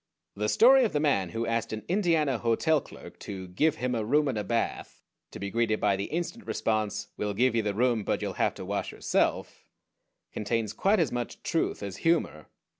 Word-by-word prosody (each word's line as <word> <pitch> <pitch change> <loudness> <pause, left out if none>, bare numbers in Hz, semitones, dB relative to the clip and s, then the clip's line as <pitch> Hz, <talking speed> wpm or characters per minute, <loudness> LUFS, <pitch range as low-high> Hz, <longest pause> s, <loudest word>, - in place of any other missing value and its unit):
The 105 +1 -1
story 260 - +6
of 225 - 0
the 150 - +1
man 135 - +1
who 115 +3 -3
asked 115 0 -1
an 110 0 -5
Indiana 165 - +1
hotel 135 +7 +2
clerk - - -13
to 95 -2 -7
"give" 150 - +1
him 125 0 -2
"a 115 -2 -1
room 145 +7 +2
and 130 - -1
a - - -2
bath," 115 +2 -2 0.3
to - - -9
be 100 0 -5
greeted 115 -1 +1
by 100 - +2
the 100 +1 -3
instant 175 - -4
response, 105 -1 -1
"We'll 105 -1 -2
give 125 +3 +3
you 115 - +2
the 105 -2 -2
room; 120 -1 +2
but - - -1
you'll - - -3
have - - +1
to - - -7
wash - - -3
yourself," - - -1 0.7
contains 110 0 -2
quite 200 +2 +2
as 160 -6 +1
much 120 -1 -5
truth - - -1
as 100 -2 -5
humor. 165 - 0
115 Hz, 205 wpm, -28 LUFS, 105-150 Hz, 0.7 s, story